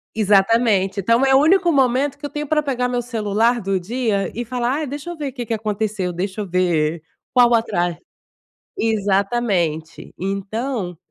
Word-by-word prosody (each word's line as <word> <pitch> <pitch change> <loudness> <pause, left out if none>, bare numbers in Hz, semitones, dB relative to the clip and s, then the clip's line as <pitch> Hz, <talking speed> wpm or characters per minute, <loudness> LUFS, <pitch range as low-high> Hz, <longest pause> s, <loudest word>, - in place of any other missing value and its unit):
Exatamente. 205 -1 +3
Então 230 +7 +3
é 265 0 +4
o - - +7
único 345 +4 +4
momento 270 +1 +1
que 290 - -5
eu - - -8
tenho 295 0 -4
pra 300 +1 +1
pegar 250 -3 -1
o - - -3
meu 245 - 0
celular 230 0 0
do 195 -1 -1
dia 210 -2 -1
e 240 - -2
falar: 250 +5 -1
"Ah, - - -1
deixa 285 +4 -6
eu 345 - -6
ver 295 -3 -4
o - - -20
que 245 -3 -6
que 225 - -1
aconteceu, 210 -3 -2
deixa 190 +4 -3
eu - - -5
ver 170 -3 0 0.3
qual 245 -2 +5
o 240 - +4
atras" 175 -7 0 0.8
exatamente. 200 -6 -1
Então, 195 +1 -3
225 Hz, 185 wpm, -20 LUFS, 195-255 Hz, 0.8 s, o